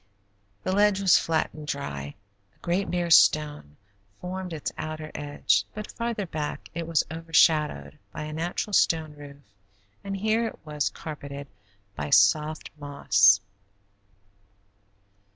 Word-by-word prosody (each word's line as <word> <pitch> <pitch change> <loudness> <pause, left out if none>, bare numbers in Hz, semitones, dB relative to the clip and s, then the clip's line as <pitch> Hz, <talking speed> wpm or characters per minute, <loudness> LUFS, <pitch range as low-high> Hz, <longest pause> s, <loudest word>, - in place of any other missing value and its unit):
The 185 - -1
ledge 205 0 +3
was 190 -3 +5
flat 160 -1 0
and 155 -1 -10
dry; 70 - -5 0.4
a - - -35
great 180 +3 0
bare 175 -1 -1
stone 150 - +4 0.4
formed 185 0 -5
its 155 -3 -4
outer 155 0 -6
edge, 145 -9 +1
but 215 - -6
farther 235 -3 -3
back 155 -3 -5
it 165 0 -4
was 165 -2 +2
overshadowed 155 - +2
by 155 - -6
a 155 0 -6
natural 175 +6 -3
stone 160 -4 +2
roof, 145 -1 -13 0.6
and 195 0 -4
here 220 +3 +1
it - - -8
was 150 -2 -1
carpeted 140 -2 -8 0.5
by 75 0 -4
soft 150 - +3
moss. 110 -8 +4
155 Hz, 130 wpm, -26 LUFS, 145-180 Hz, 0.6 s, was